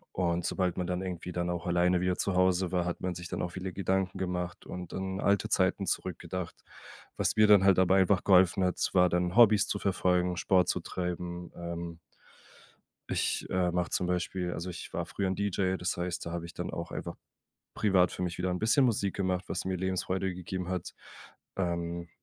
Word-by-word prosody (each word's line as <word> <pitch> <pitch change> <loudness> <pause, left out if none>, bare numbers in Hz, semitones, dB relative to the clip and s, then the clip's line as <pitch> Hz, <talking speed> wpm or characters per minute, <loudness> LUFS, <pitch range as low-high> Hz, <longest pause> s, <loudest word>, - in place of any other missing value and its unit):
Und 85 -1 0
sobald 90 -3 0
man 90 -1 -2
dann 90 0 -2
irgendwie 90 -1 -5
dann 85 0 -2
auch 85 -1 -3
alleine 90 0 +2
wieder 90 0 0
zu 95 - 0
Hause 90 0 +2
war, 90 -1 +2
hat 90 0 -3
man 90 -1 -3
sich 90 -1 -7
dann - - -3
auch 90 - -2
viele 95 +1 -5
Gedanken 95 0 -1
gemacht 90 -1 -3
und 90 -1 -7
an 95 0 -3
alte 100 0 +2
Zeiten 95 +1 +1
zurückgedacht. 90 -1 -3 0.6
Was - - 0
mir 110 - +6
dann 105 -2 +7
halt 95 -1 +5
dabei 95 +1 +5
einfach 95 0 +2
geholfen 95 -1 +5
hat 90 -1 0
s - - -1
war 90 -1 +5
dann, 90 0 0
Hobbys 105 -3 +6
zu 100 - -2
verfolgen, 90 -2 +1
Sport 90 0 +3
zu - - 0
treiben. 90 -1 -4
Ähm 85 -1 -6 1.1
ich, - - 0
äh, 90 -1 +1
mache 90 0 -1
zum 90 - 0
Beispiel 90 0 -1
also 85 +3 -5
ich 90 - -8
war - - -2
früher 100 - -2
'n 95 - -1
DJ, 95 -2 0
das 90 - -2
heißt, 90 0 -3
da 85 - -4
habe 85 -1 -4
ich 85 - -10
dann - - -4
auch - - -5
einfach - - -5 0.6
privat 95 -4 +3
für - - -5
mich 90 -1 -3
wieder 90 +1 -1
'n 90 - -1
bisschen 115 +7 +4
Musik 100 -5 +1
gemacht, 95 -1 -1
was - - -3
mir 95 0 -1
Lebensfreude 95 0 -1
gegeben 90 0 -5
hat. 90 -2 -4 0.6
Ähm 85 -2 -2
90 Hz, 205 wpm, -30 LUFS, 90-95 Hz, 1.1 s, dann